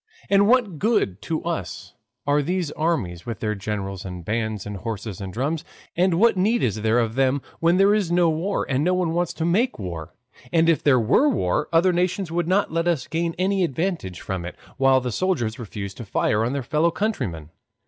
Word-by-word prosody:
And 200 0 +5
what 225 - +2
good 190 - +1
to 160 -1 -3
us 170 -1 -4 0.3
are 145 +1 +3
these 175 0 -1
armies 110 - -2
with 115 - -4
their 105 -1 -1
generals 100 -2 -4
and 90 -3 -7
bands 110 -2 -2
and 105 -1 -5
horses 105 -1 -5
and 95 -1 -5
drums? 145 - -2 0.3
And 180 0 +3
what 225 +5 +4
need 215 +6 +2
is 110 -2 0
there 110 +2 +2
of 115 -2 +1
them 135 +2 +1 0.2
when 170 +2 +3
there 195 +2 +5
is 205 -5 0
no 175 0 +4
war, 165 +5 -1
and 135 +1 0
no 180 +2 +2
one 175 -3 0
wants 175 0 0
to 160 - -2
make 220 +10 +1
war? 85 -5 -6 0.4
and 165 +1 +3
if 165 -2 +3
there 135 -4 +4
were 120 - +3
a - - +5
war, 150 - 0
other 170 +2 +4
nations 180 0 0
would 170 0 -1
not 190 -1 +1
let 165 +1 0
us 160 -7 +1
gain 165 0 -2
any 190 +1 +1
advantage 160 - -2
from 95 -2 -4
it; 90 - -7 0.2
while 135 -1 +4
the 125 -1 -3
soldiers 120 - -1
refuse 100 -3 -6
to 120 - -8
fire 105 +1 +1
on 120 +3 -1
their 140 -2 -2
fellow 155 +6 +2
countrymen. 95 - -3
150 Hz, 210 wpm, -23 LUFS, 110-180 Hz, 0.4 s, And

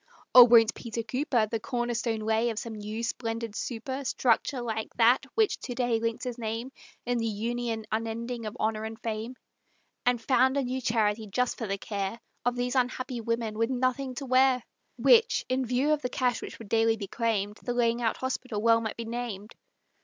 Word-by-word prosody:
Or 250 -1 +11
won't 225 -2 +6
Peter 230 -1 -5
Cooper 250 -1 +1
The 225 +1 -3
corner 240 +1 -2
stone 230 -1 -1
lay 220 +2 +1
of 225 - -4
some 230 0 -4
new 215 +2 -5
splendid 230 -2 -3
super 260 +5 -4
Structure, 250 +1 +1
like 220 -2 -3
that 245 +3 +4
which 435 -2 +2
to 245 - -6
day 240 -2 +1
links 230 0 -2
his 250 -1 -4
name 225 +3 -3 0.3
In 245 0 0
the 230 - 0
Union 225 +1 -2
unending 230 +1 -3
of 215 +3 -7
Honor 215 0 0
and 220 0 -6
Fame, 225 +2 -4 0.7
And 245 -1 +2
found 260 +3 +3
a 280 - +2
new 255 +1 -2
charity 220 -2 +1
just 250 +5 0
for 225 - -3
the 195 0 -1
care 200 +2 -4 0.2
Of 245 0 +1
these 245 0 -1
unhappy 255 -1 -1
women 230 -1 -2
with 230 +1 +2
nothing 255 0 -1
to 275 - -5
wear, 255 -1 +4 0.3
Which, 470 0 +4
in 255 0 0
view 260 +5 +2
of 300 - -1
the 250 - -2
cash 250 -1 0
which - - -7
would 225 - -10
daily 225 0 +3
be 205 - -5
claimed, 210 -1 -1
The 245 - -3
Laying 235 0 +2
out 225 -1 0
Hospital 255 -4 -3
well 230 +1 +4
might 220 -2 -4
be 230 - -4
named? 225 -3 -5
235 Hz, 200 wpm, -28 LUFS, 225-250 Hz, 0.7 s, Or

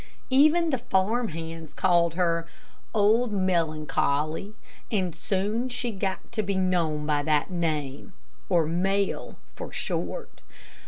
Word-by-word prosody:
Even 310 +5 +5
the 265 - 0
farm 225 +1 +1
hands 165 -2 -7
called 170 -3 +3
her 170 -2 +1 0.4
"Old 220 +2 +3
Melancholy," 160 -1 0 0.4
and 185 -6 0
soon 210 +7 -1
she 245 -1 -2
got 190 -2 -3
to 230 -2 0
be 200 -1 -2
known 170 -5 +1
by 150 -1 +1
that 150 +3 +1
name, 155 -2 -2 0.4
or 170 -4 +4
Mel, 190 +5 0 0.2
for - - -7
short. - - -4
185 Hz, 120 wpm, -27 LUFS, 165-215 Hz, 0.4 s, Even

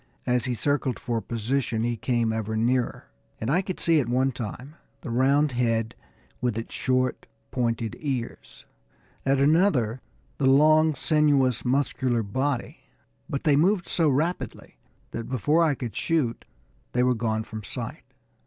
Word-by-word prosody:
As 125 0 +1
he 125 -2 -1
circled 135 +1 0
for 115 -2 -2
position 115 +1 -1
he 120 0 0
came 115 -1 0
ever 110 0 -2
nearer, 120 +2 0 0.3
and 110 +4 -1
I 175 +5 +3
could 185 -1 -5
see 165 -2 +3
at 120 -5 -1
one 130 +2 +2
time 125 +4 -7 0.3
the 130 - -6
round 140 +4 +3
head, 115 -2 0 0.5
with 120 -3 0
its 115 - -5
short, 130 -1 0 0.2
pointed 115 -3 -1
ears; 130 -6 -5 0.6
at 135 0 +3
another 140 - +3 0.4
the 135 - +3
long, 155 +3 +5
sinuous, 140 -4 +2
muscular 130 -2 0
body; 130 +5 -2 0.5
but 140 - -3
they 150 -3 +4
moved 180 +5 +2
so 165 -3 +2
rapidly 145 -2 -2 0.4
that 115 +1 -5
before 145 +6 +2
I 155 -3 +2
could 120 -5 -6
shoot 145 -8 -1 0.5
they 125 - +2
were 125 0 +3
gone 110 -2 -1
from 110 0 -7
sight. - - -6
130 Hz, 150 wpm, -26 LUFS, 115-145 Hz, 0.6 s, long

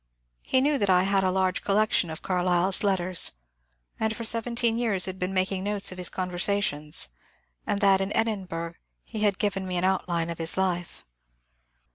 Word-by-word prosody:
He 260 - +1
knew 285 +1 +2
that 200 - +1
I 180 -1 +5
had 195 0 +2
a 185 - +2
large 185 0 0
collection 205 -3 +2
of 160 - -7
Carlyle's 180 +1 +2
letters, 185 -3 +1 0.7
and 220 0 0
for 230 - -6
seventeen 230 0 +1
years 210 -6 +2
had 185 0 -5
been 180 +1 -2
making 190 0 0
notes 205 -1 0
of 185 - -9
his 180 - +2
conversations, 180 - 0 0.6
and 200 - -1
that 195 -1 +4
in 195 - -1
Exlin 215 -4 0
burgh 165 0 -5 0.3
he 220 - -7
had 205 -2 +2
given 195 -3 -1
me 180 -1 -2
an 175 - 0
outline 175 -3 0
of 170 - -7
his 165 +2 0
life. 180 -2 -2
190 Hz, 180 wpm, -26 LUFS, 180-205 Hz, 0.7 s, I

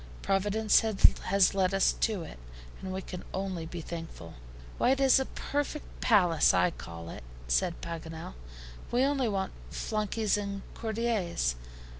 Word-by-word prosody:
Providence 205 +2 +3
has 200 -3 +3
led 195 0 +2
us 195 - +4
to 210 -6 0
it, 60 - -10 0.4
and 190 - -5
we 190 0 -4
can 180 - -7
only 185 -4 -3
be 170 0 -6
thankful." 165 - -8 0.5
"Why, - - +3
it 265 +1 +3
is 270 -1 +6
a 265 - 0
perfect 290 +1 -4
palace, 180 -8 +4
I 180 - +3
call 85 - -9
it," - - -9 0.2
said 60 - +1
Paganel; 160 - -6 0.6
"we 245 +2 +2
only 270 -3 +1
want 195 -2 -2 0.2
flunkeys 215 -1 -1
and 200 -1 -4
courtiers. 220 - -1
195 Hz, 145 wpm, -30 LUFS, 170-220 Hz, 0.6 s, is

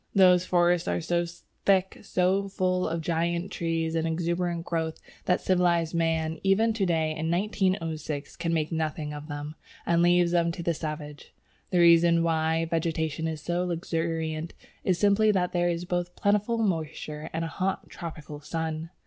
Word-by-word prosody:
Those 185 -2 +6
forests 175 -1 +3
are - - 0
so 170 +1 0 0.4
thick, 190 -1 +2
so 190 +2 +1
full 185 -1 0
of 165 +1 -2
giant 170 +2 -1
trees 165 -1 -1
and 165 0 0
exuberant 170 +1 -1
growth, 160 -2 -2 0.3
that 180 - +2
civilized 175 -3 +2
man 165 -1 0
even 210 +4 +3
to 200 -4 0
day 160 -2 +1
in 160 +1 -2
1906 170 -5 -1
can 165 0 -1
make 160 -1 0
nothing 155 -2 -2
of 150 0 -8
them, 145 0 -5 0.3
and 170 0 +3
leaves 175 0 +4
them 170 -1 +2
to 170 - -6
the 170 - +1
savage. 150 -2 -7 0.3
The 180 - 0
reason 170 0 +6
why 160 0 +1
vegetation 160 -1 -1
is 160 -2 -4
so 175 +2 -1
luxuriant 165 -2 -2 0.3
is 185 -2 +2
simply 205 +3 +4
that 180 -2 +1
there 175 0 +1
are 170 +1 -2
both 175 0 -2
plentiful 210 +3 +1
moisture 160 -6 -2
and 165 +1 -2
a 165 - -7
hot, 190 +1 -1
tropical 150 -3 -8
sun. 160 +1 -4
170 Hz, 165 wpm, -27 LUFS, 160-180 Hz, 0.4 s, Those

